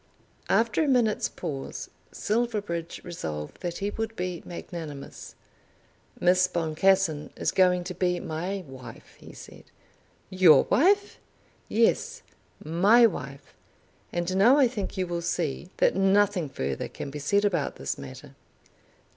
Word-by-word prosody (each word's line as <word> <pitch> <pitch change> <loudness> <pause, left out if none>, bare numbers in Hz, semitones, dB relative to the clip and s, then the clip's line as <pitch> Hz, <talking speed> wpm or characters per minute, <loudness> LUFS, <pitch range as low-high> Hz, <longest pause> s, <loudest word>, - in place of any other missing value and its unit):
After 225 +3 +2
a - - 0
minute's 240 -6 +2
pause 145 -6 -6 0.2
Silverbridge 205 -7 -2
resolved 75 - -6
that 175 -1 -4
he 200 +1 -2
would 225 +1 -4
be 180 -3 -4
magnanimous. 160 -5 -8 0.8
"Miss 185 +1 +4
Boncassen 170 -1 +1
is - - -1
going 180 -1 +3
to 180 +1 -5
be 180 0 0
my 180 +5 -4
wife," 130 -3 -12
he - - -12
said. - - -13 0.7
"Your 180 -6 +6
wife!" 400 +7 +3 0.5
"Yes; 225 +2 +1 0.4
my 200 +10 +5
wife. 140 - -4 0.6
And 175 +1 -2
now 235 +8 +6
I 275 -3 +5
think 210 -5 -5
you 185 - 0
will 175 -1 -3
see 170 -1 -2
that - - +3
nothing 195 -3 +2
further 70 - -3
can 140 - -7
be 150 - -6
said 200 +8 +1
about 175 -8 0
this - - -4
matter." - - -10
180 Hz, 130 wpm, -27 LUFS, 160-205 Hz, 0.8 s, Your